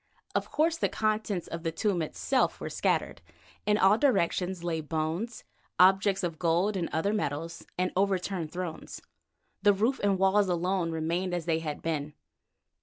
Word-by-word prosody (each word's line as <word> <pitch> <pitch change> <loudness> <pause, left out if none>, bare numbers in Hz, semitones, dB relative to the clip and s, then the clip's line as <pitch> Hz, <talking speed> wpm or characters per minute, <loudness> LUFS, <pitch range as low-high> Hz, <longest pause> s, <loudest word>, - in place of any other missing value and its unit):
Of - - -1
course 325 +2 +1
the - - +1
contents 215 -4 -1
of 165 - -5
the 165 -1 -2
tomb 185 +1 0
itself 255 - 0
were - - -5
scattered. - - 0 0.5
In 210 0 +4
all 205 +2 +5
directions 185 -8 +1
lay 165 -2 -1
bones, 160 +9 -3 0.4
objects 195 +1 +5
of 165 -3 -3
gold 175 +5 +2
and 175 -3 -1
other 160 +7 0
metals, 165 -3 -3
or 185 0 0
overturned 190 -3 0
thrones. 175 -3 -6 0.6
The 205 +1 +5
roof 225 +7 +1
and 200 -1 +3
walls 195 +1 +3
alone 180 0 0
remained 170 +3 -1
as 170 -3 -3
they 165 -2 +1
had 150 -2 -5
been. 150 -2 -2
180 Hz, 160 wpm, -29 LUFS, 165-200 Hz, 0.6 s, all